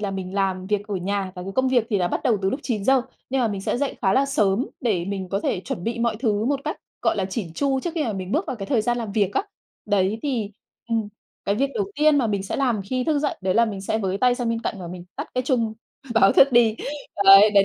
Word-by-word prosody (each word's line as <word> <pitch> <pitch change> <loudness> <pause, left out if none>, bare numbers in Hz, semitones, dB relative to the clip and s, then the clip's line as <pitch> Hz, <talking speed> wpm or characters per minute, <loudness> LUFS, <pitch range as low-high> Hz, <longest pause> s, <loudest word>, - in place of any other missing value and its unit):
là 205 -2 -2
mình 190 0 -5
làm 190 -2 0
việc 205 0 -1
ở 205 - -2
nhà 190 +1 -2
và 180 - -7
cái 195 +1 -6
công 260 0 +2
việc 245 -3 +2
thì 205 - +2
là 180 - +1
bắt - - -2
đầu 220 -5 +2
từ 190 - +2
lúc 270 - -3
9:00 245 +2 +2 0.3
nhưng 270 - +1
mà 235 - +2
mình 200 -2 -3
sẽ - - -1
dậy 285 -1 -2
khá 190 -1 +3
là 275 +1 +3
sớm 240 -4 +1
để 205 -9 0
mình 190 -1 -4
có 195 +1 -1
thể 185 - -1
chuẩn 175 -1 -5
bị 235 +1 -2
mọi 235 -2 0
thứ 215 -3 0
một 275 +2 0
cách - - -2 0.3
gọi - - +2
là 195 - 0
chỉn 190 -3 -4
chu 275 -2 +1
trước 345 - -3
khi 315 -3 0
mà 220 - -1
mình 190 0 -5
bước 325 +6 +1
vào 250 - -3
cái 195 - -6
thời 230 -3 +1
gian 240 +1 0
làm 220 -4 -4
việc 205 -2 +1
á. - - +2 0.4
Đấy, 205 +1 +1
thì, 240 -8 -1 0.4
ừ, 230 - 0 0.5
cái 200 - +1
việc 275 +5 0
đầu 405 -2 -2
tiên 300 -1 +4
mà 240 - +2
mình 200 -2 -1
sẽ 195 - -4
làm 245 -6 +1
khi 255 +5 -2
thức 305 -2 +1
dậy 290 0 -1
đấy 185 0 0
là 235 - +5
mình 205 -4 -4
sẽ 220 +3 -1
với 195 -1 -1
tay 250 +1 +4
sang 245 -2 -2
bên 230 0 -1
cạnh - - -2
và 175 - -6
mình 175 0 -8
tắt - - -5
cái 255 - +1
chung 235 -4 0 0.4
báo 195 -3 +6
thức 275 -1 +6
đi. 230 -2 +5 0.5
Đấy, 195 +2 +9
đấy 200 - +7
215 Hz, 285 wpm, -23 LUFS, 195-255 Hz, 0.5 s, Đấy